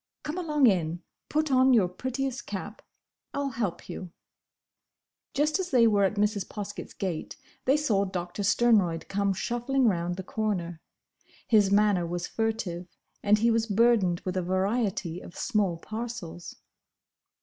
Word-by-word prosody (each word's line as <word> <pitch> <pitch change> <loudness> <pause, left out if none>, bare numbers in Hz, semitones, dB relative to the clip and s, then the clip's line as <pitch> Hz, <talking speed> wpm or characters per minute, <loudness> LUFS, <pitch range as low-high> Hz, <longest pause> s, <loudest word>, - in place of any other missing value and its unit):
Come 305 +4 -3
along 300 -5 +2
in. 175 -5 +2 0.3
Put 310 -1 0
on 260 0 +5
your 200 -6 +4
prettiest 260 +7 -4
cap. 205 +1 -6 0.5
I'll 280 -1 -1
help 215 -7 -3
you." 185 -3 -7 1.2
Just 300 +5 +2
as 365 -1 -2
they 245 -3 +5
were 205 -3 +4
at 195 - 0
Mrs. 205 -1 +1
Poskett's 205 -1 -7
gate 180 -5 -4 0.3
they 270 +3 +4
saw 215 -10 +1
Doctor 180 0 -4
Sternroyd 200 -6 +3
come 200 0 +1
shuffling 240 +6 0
round 175 -3 0
the 190 - -6
corner. 180 -6 -2 0.7
His 210 -4 +5
manner 200 -4 +3
was 175 +1 -3
furtive, 215 -6 -2 0.3
and 210 +1 +4
he 230 +2 +3
was 225 0 +1
burdened 210 -5 +3
with 185 0 -4
a 185 - +1
variety 185 -1 -1
of 170 - -12
small 205 -8 0
parcels. 215 -4 -6
205 Hz, 145 wpm, -28 LUFS, 180-240 Hz, 1.2 s, on